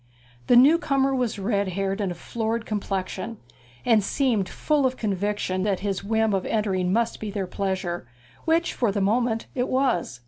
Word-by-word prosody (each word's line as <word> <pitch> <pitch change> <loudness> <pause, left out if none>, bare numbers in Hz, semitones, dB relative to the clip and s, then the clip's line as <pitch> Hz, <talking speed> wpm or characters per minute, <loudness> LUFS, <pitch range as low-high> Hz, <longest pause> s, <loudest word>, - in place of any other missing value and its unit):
The - - +5
new 285 +7 +7
comer 275 -4 +1
was 245 -4 -1
red 200 0 0
haired 195 +2 -1
and 195 -3 -1
of 175 - -7
florid 225 +4 -3
complexion, 200 +1 -3 0.5
and 225 -4 +4
seemed 220 -4 +1
full 295 -3 +1
of 255 - -2
a - - -19
conviction 205 -2 -1
that 195 -1 0
his 195 -1 -2
whim 220 +1 +1
of 190 -1 0
entering 190 -4 0
must 230 +3 0
be 215 - -4
their 200 -1 -2
pleasure, 185 -5 -3 0.4
which 330 +1 +2
for 235 -5 +1
the 200 - -1
moment 225 +3 +1
it 250 -1 -1
was. 250 - 0
210 Hz, 180 wpm, -25 LUFS, 195-240 Hz, 0.5 s, new